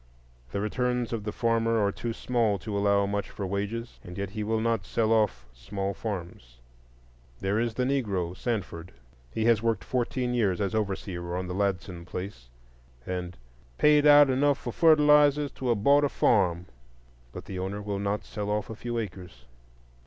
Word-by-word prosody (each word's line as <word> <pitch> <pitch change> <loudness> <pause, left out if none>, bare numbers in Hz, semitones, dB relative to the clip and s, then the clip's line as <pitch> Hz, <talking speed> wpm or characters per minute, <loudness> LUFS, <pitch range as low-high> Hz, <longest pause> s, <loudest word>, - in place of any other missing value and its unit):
The - - -2
returns 125 +3 -1
of 110 -3 -3
the 105 - -2
farmer 115 0 +1
are 100 -1 +2
too 115 +3 -4
small 115 -3 0
to 100 +4 -6
allow 100 0 +3
much 100 0 -2
for 100 - -5
wages, 105 +5 -4
and 90 0 -9
yet 100 -1 -3
he 105 0 -4
will 110 +1 0
not 115 -2 0
sell 115 -1 +1
off 105 - +1
small 100 +9 -4
farms. 85 - -6 0.8
There 100 +3 0
is 115 -1 -1
the 125 - 0
Negro 100 -10 -1
Sanford; 95 -7 -4 0.4
he 110 - -2
has 115 -2 +4
worked 115 -5 0
fourteen 125 +3 -1
years 100 -7 +1
as 100 0 -1
overseer 95 -4 -3
on 95 - -3
the 90 - -5
Ladson 95 -3 -2
place, 90 -12 -7 0.6
and 90 -1 -4 0.4
"paid 150 0 +5
out 145 -2 +8
enough 140 +2 +2
for 120 -4 -6
fertilizers 150 -2 +5
to 130 - -4
have 110 -4 +1
bought 145 +3 +5
a 145 - +2
farm," 90 -8 +2 0.7
but - - -9
the 95 - -6
owner 95 +2 -3
will 100 -1 -3
not 100 +1 -2
sell 105 -1 -5
off 105 +1 -2
a - - -6
few 120 +2 -4
acres. 90 - -7
105 Hz, 175 wpm, -27 LUFS, 95-120 Hz, 0.8 s, out